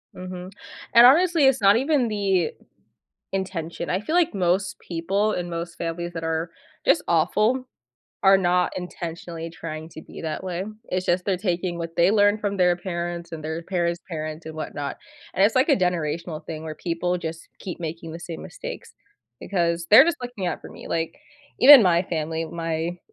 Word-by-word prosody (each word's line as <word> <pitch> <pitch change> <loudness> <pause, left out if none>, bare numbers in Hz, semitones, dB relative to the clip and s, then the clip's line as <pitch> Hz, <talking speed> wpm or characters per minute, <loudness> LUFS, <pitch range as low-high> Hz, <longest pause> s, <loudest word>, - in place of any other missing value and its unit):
Mhm, 185 0 -7 0.4
and, 235 +1 +9
honestly, 325 +2 +5
it's 265 -4 +4
not 200 +2 +6
even 270 -1 +2
the 195 -5 +1 0.8
intention. 185 -4 -4
I 185 - +1
feel 310 +11 -2
like 345 -7 +3
most 185 +1 0
people 195 +5 -1
in 175 -1 -3
most 170 0 -5
families 170 +1 -4
that 165 -1 -5
are 160 +1 -2 0.3
just 175 - +4
awful 210 +10 +2 0.6
are 195 0 +7
not 180 -1 +1
intentionally 170 -2 -6
trying 160 -1 -7
to 160 - -10
be - - -11
that 160 +3 -4
way. 185 0 -3 0.3
It's 185 0 -1
just 180 +1 +1
they're 190 -3 0
taking 180 -2 -2
what 165 -1 -6
they 175 +3 +5
learned 205 0 +3
from 200 -1 -1
their 180 -1 +4
parents 175 -1 -5
and 160 - -6
their 160 +2 -4
parents' 170 -1 -1
parents 155 0 -5
and 160 - -8
whatnot, 145 -2 -5 0.3
and 195 - +3
it's, 220 - +3
like, 260 +5 +3
a 275 - +5
generational 170 -3 -2
thing 160 -1 -6
where 155 -1 -6
people 175 +1 -2
just 165 -1 -6
keep 180 -2 -7
making 165 0 -6
the 170 - -8
same 170 -2 -7
mistakes - - -8 0.5
because 170 -2 -1
they're 220 - +9
just 340 0 0
looking 245 -7 -4
out - - -2
for - - -10
me. - - -11
Like, 165 0 -2 0.4
even 275 -3 +10
my 175 -2 +4
family, 160 -2 -3
my 165 +1 -3
175 Hz, 180 wpm, -24 LUFS, 165-195 Hz, 0.8 s, even